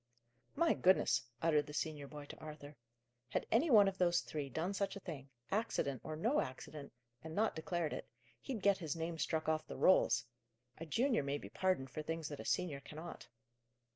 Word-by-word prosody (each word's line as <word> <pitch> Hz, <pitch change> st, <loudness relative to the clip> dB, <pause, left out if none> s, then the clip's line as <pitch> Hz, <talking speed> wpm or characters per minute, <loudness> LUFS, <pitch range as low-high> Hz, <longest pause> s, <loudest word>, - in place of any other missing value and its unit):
"My 335 Hz, +2 st, +4 dB
goodness!" 185 Hz, +1 st, +4 dB, 0.2 s
uttered 150 Hz, -3 st, +3 dB
the 150 Hz, -, -7 dB
senior 150 Hz, -2 st, -2 dB
boy, 145 Hz, 0 st, -8 dB
to -, -, -10 dB
Arthur. 150 Hz, -1 st, -9 dB, 0.5 s
"Had -, -, -1 dB
any 255 Hz, +9 st, +4 dB
one 210 Hz, -6 st, +8 dB
of 190 Hz, -1 st, -2 dB
those 175 Hz, -1 st, +4 dB
three 145 Hz, -3 st, -4 dB
done 165 Hz, +9 st, -1 dB
such 200 Hz, 0 st, -1 dB
a -, -, -5 dB
thing 145 Hz, -8 st, -7 dB, 0.2 s
accident 145 Hz, -, 0 dB
or 155 Hz, -, -4 dB
no 230 Hz, -, +2 dB
accident 140 Hz, +2 st, -7 dB, 0.3 s
and 160 Hz, 0 st, -6 dB
not 215 Hz, +1 st, +2 dB
declared 165 Hz, -1 st, -1 dB
it, -, -, -5 dB, 0.3 s
he'd 245 Hz, -7 st, -4 dB
get 200 Hz, -1 st, +4 dB
his 160 Hz, -4 st, -3 dB
name 165 Hz, 0 st, -3 dB
struck 155 Hz, +1 st, 0 dB
off 155 Hz, 0 st, +1 dB
the -, -, -6 dB
rolls. 185 Hz, -, +5 dB, 0.5 s
A 165 Hz, -, -6 dB
junior 240 Hz, -, +2 dB
may 140 Hz, +1 st, -1 dB
be -, -, -9 dB
pardoned 185 Hz, -9 st, 0 dB
for 155 Hz, -, -4 dB
things 160 Hz, 0 st, -3 dB
that 145 Hz, -, -6 dB
a -, -, -7 dB
senior 150 Hz, -6 st, 0 dB
cannot." 155 Hz, +4 st, -9 dB
160 Hz, 195 wpm, -37 LUFS, 150-190 Hz, 0.5 s, one